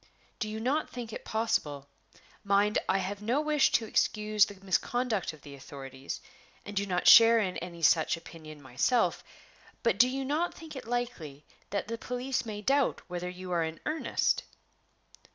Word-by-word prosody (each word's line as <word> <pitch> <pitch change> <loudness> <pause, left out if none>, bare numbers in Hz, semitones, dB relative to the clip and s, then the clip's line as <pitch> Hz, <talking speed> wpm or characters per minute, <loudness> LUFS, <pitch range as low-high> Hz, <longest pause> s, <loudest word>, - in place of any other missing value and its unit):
"Do 215 - -2
you 215 +1 -5
not 270 +7 0
think 235 -3 -7
it - - -7
possible 150 -11 -1 0.6
mind, 200 +1 +3
I - - +3
have 195 +2 -4
no 235 +7 +1
wish 300 -2 +3
to 230 - +2
excuse 210 -1 +2
the 205 - -10
misconduct 220 +2 0
of 155 -3 -16
the 145 - -10
authorities, 135 -1 -8 0.4
and 205 - -8
do 200 0 0
not 180 -2 0
share 230 0 +9
in 185 -4 -1
any 170 -1 -8
such 160 +2 +4
opinion 155 -3 -12
myself 135 - +1 0.6
but 230 -4 +1
do 250 +2 +6
you 270 +1 -3
not 310 +6 -1
think 320 -2 -10
it 260 - -8
likely 185 - -4 0.2
that 200 +1 -2
the 230 +1 -4
police 250 0 -3
may 210 -1 -6
doubt 275 +4 +1
whether 180 0 -3
you 180 0 -8
are 170 -2 +1
in 160 0 -5
earnest?" 310 +1 0
210 Hz, 170 wpm, -30 LUFS, 170-245 Hz, 0.6 s, share